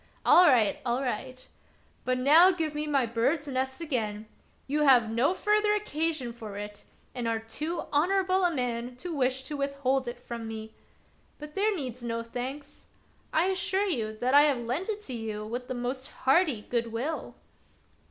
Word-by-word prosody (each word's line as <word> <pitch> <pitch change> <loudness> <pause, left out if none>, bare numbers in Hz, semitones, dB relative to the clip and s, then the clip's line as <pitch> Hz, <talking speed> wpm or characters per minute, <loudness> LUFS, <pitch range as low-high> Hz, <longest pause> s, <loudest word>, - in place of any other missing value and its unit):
All 360 0 +8
right! 235 -8 +4
all 245 +2 0
right! 255 +1 -4 0.6
But 255 0 +1
now 305 +8 +7
give 325 -5 -1
me 300 0 -3
my 275 -4 +2
bird's 235 +7 0
nest 265 +1 -3
again; 220 -9 -2 0.4
you 295 +2 -1
have 250 -6 +5
no 255 +10 +2
further 420 +1 +2
occasion 315 - -2
for 220 -4 -8
it 205 0 -8 0.3
and 245 -3 -3
are 230 0 +1
too 305 +10 -4
honorable 375 +4 +2
a 355 - +4
man 245 -3 -3
to 340 +5 -6
wish 260 -1 0
to 295 +3 -5
withhold 275 -2 -1
it 240 0 -5
from 235 -2 -7
me. 220 0 -7 0.6
But 300 0 -10
there 415 +3 +1
needs 255 -6 -5
no 230 -1 -3
thanks; 265 +5 -7 0.4
I 320 +3 +3
assure 380 +1 0
you 220 - -1
that 250 +4 0
I 285 - +9
have 290 -3 +3
lent 250 - -3
it 425 -1 -4
you 220 -4 -5
with 245 +3 -5
the 255 - -4
most 255 +2 -3
hearty 270 - +2
good 235 0 -2
will." 265 +8 -4
260 Hz, 170 wpm, -28 LUFS, 235-310 Hz, 0.6 s, I